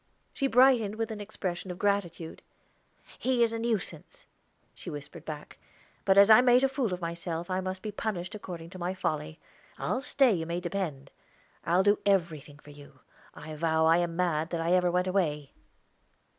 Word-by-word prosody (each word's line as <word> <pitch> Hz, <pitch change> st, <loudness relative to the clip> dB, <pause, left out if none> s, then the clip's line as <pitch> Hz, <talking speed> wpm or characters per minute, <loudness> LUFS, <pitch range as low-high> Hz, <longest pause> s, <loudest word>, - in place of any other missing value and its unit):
She 275 Hz, -, 0 dB
brightened 245 Hz, -4 st, +4 dB
with 225 Hz, 0 st, -3 dB
an 210 Hz, -1 st, -6 dB
expression 190 Hz, -3 st, -5 dB
of 180 Hz, -, -5 dB
gratitude. 185 Hz, -5 st, -2 dB, 0.8 s
"He 250 Hz, -2 st, +2 dB
is 230 Hz, -1 st, +1 dB
a 230 Hz, -, -3 dB
nuisance," 225 Hz, -4 st, -3 dB, 0.5 s
she -, -, -8 dB
whispered 145 Hz, -2 st, -9 dB
back; 150 Hz, -2 st, -8 dB, 0.5 s
"but 190 Hz, 0 st, +4 dB
as 200 Hz, +2 st, +8 dB
I 220 Hz, -, +9 dB
made 250 Hz, +1 st, +5 dB
a -, -, +5 dB
fool 265 Hz, -6 st, -1 dB
of 180 Hz, 0 st, -4 dB
myself, 170 Hz, +1 st, -4 dB
I 185 Hz, 0 st, 0 dB
must 185 Hz, 0 st, -5 dB
be 215 Hz, -, -4 dB
punished 205 Hz, -2 st, -4 dB
according 175 Hz, -5 st, -8 dB
to 185 Hz, -, -10 dB
my 180 Hz, +2 st, -2 dB
folly. 155 Hz, -2 st, -3 dB, 0.4 s
I'll 255 Hz, -, -2 dB
stay, 270 Hz, -3 st, +3 dB
you 165 Hz, -3 st, -3 dB
may 170 Hz, +1 st, -2 dB
depend. 175 Hz, -7 st, -4 dB, 0.5 s
I'll 175 Hz, +3 st, +3 dB
do 205 Hz, +1 st, +3 dB
everything 165 Hz, -7 st, 0 dB
for 145 Hz, 0 st, -15 dB
you. 145 Hz, 0 st, -15 dB, 0.3 s
I 155 Hz, +1 st, -9 dB
vow 160 Hz, 0 st, +1 dB
I 165 Hz, +1 st, +5 dB
am 175 Hz, -1 st, -1 dB
mad, 165 Hz, -3 st, 0 dB
that 170 Hz, -, -3 dB
I 165 Hz, +1 st, 0 dB
ever 180 Hz, -1 st, +3 dB
went 180 Hz, +1 st, +1 dB
away." 155 Hz, -7 st, -1 dB
180 Hz, 185 wpm, -29 LUFS, 165-210 Hz, 0.8 s, I